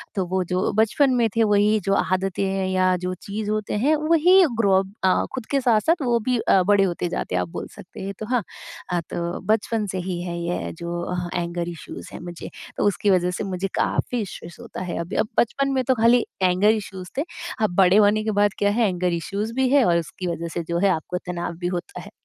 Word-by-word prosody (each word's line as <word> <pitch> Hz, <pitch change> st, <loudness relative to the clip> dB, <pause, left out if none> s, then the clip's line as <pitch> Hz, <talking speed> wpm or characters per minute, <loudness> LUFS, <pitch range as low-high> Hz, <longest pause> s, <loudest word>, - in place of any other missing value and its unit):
तो 190 Hz, -2 st, 0 dB
वो 185 Hz, +1 st, -1 dB
जो 180 Hz, +2 st, -1 dB
बचपन 225 Hz, +6 st, +3 dB
में 235 Hz, -2 st, +3 dB
थे 225 Hz, -, +4 dB
वही 210 Hz, +1 st, +3 dB
जो 195 Hz, -, +2 dB
आदतें 185 Hz, +1 st, 0 dB
हैं 190 Hz, -1 st, -1 dB
या 185 Hz, 0 st, +2 dB
जो 180 Hz, +1 st, -3 dB
चीज़ 210 Hz, +1 st, -4 dB
होते 215 Hz, -1 st, -2 dB
हैं, 310 Hz, +2 st, +4 dB
वही 330 Hz, +5 st, +5 dB, 0.2 s
ग्रो 200 Hz, -4 st, +3 dB
अप 195 Hz, +1 st, -5 dB
अ, 185 Hz, -, +3 dB
खुद 255 Hz, -4 st, -5 dB
के 275 Hz, -1 st, +2 dB
साथ-साथ 245 Hz, -, +2 dB
वो 235 Hz, -1 st, +2 dB
भी 245 Hz, +2 st, 0 dB
अ, 190 Hz, -, +3 dB
बड़े 200 Hz, 0 st, +4 dB
होते 175 Hz, -1 st, -1 dB
जाते 90 Hz, -, -3 dB
हैं 90 Hz, -, +2 dB
आप 90 Hz, -, -4 dB
बोल -, -, -6 dB
सकते -, -, -12 dB
हैं। 195 Hz, +1 st, -4 dB
तो 215 Hz, -, -4 dB
हाँ, 245 Hz, -2 st, 0 dB, 0.5 s
अ, 175 Hz, -, +1 dB
तो 170 Hz, 0 st, -3 dB
बचपन 220 Hz, 0 st, 0 dB
से 190 Hz, -, -4 dB
ही 175 Hz, -1 st, -3 dB
है 170 Hz, -1 st, -4 dB
ये 175 Hz, +1 st, -3 dB
जो 170 Hz, 0 st, -5 dB, 0.5 s
एंगर 170 Hz, 0 st, -2 dB
इशूज़ 170 Hz, -, -9 dB
हैं -, -, -7 dB
मुझे। 175 Hz, -1 st, -8 dB, 0.3 s
तो -, -, 0 dB
उसकी 205 Hz, +1 st, +1 dB
वजह 180 Hz, -1 st, +3 dB
से 180 Hz, -, -4 dB
मुझे 190 Hz, 0 st, -2 dB
काफ़ी 245 Hz, -, 0 dB
इशूज़ 175 Hz, -3 st, -8 dB
होता 235 Hz, -5 st, -8 dB
है 180 Hz, -1 st, -4 dB
अभी। 170 Hz, +3 st, -5 dB
अब 215 Hz, -, +1 dB
बचपन 275 Hz, +4 st, +1 dB
में 260 Hz, -1 st, +1 dB
तो 260 Hz, -, +2 dB
खाली 235 Hz, +1 st, +4 dB, 0.2 s
एंगर 185 Hz, +3 st, +3 dB
इशूज़ 190 Hz, -4 st, -5 dB
थे। 285 Hz, -, +1 dB, 0.4 s
अब 200 Hz, -5 st, +1 dB
बड़े 190 Hz, 0 st, +5 dB
होने 215 Hz, +1 st, +4 dB
के 215 Hz, -, -1 dB
बाद 205 Hz, 0 st, +2 dB
क्या 205 Hz, -, +2 dB
है? 225 Hz, 0 st, +2 dB
एंगर 180 Hz, -1 st, -1 dB
इशूज़ 200 Hz, +7 st, -3 dB
भी 260 Hz, 0 st, +1 dB
है 280 Hz, -2 st, +5 dB
और 170 Hz, -1 st, +3 dB
उसकी 180 Hz, +3 st, -6 dB
वजह 170 Hz, 0 st, -3 dB
से 170 Hz, -, -2 dB
जो 170 Hz, 0 st, 0 dB
है 200 Hz, 0 st, +3 dB
आपको 180 Hz, +1 st, -1 dB
तनाव 175 Hz, -1 st, -5 dB
भी 175 Hz, -, -2 dB
होता 180 Hz, -1 st, -5 dB
है। -, -, -12 dB
195 Hz, 235 wpm, -23 LUFS, 180-220 Hz, 0.5 s, वही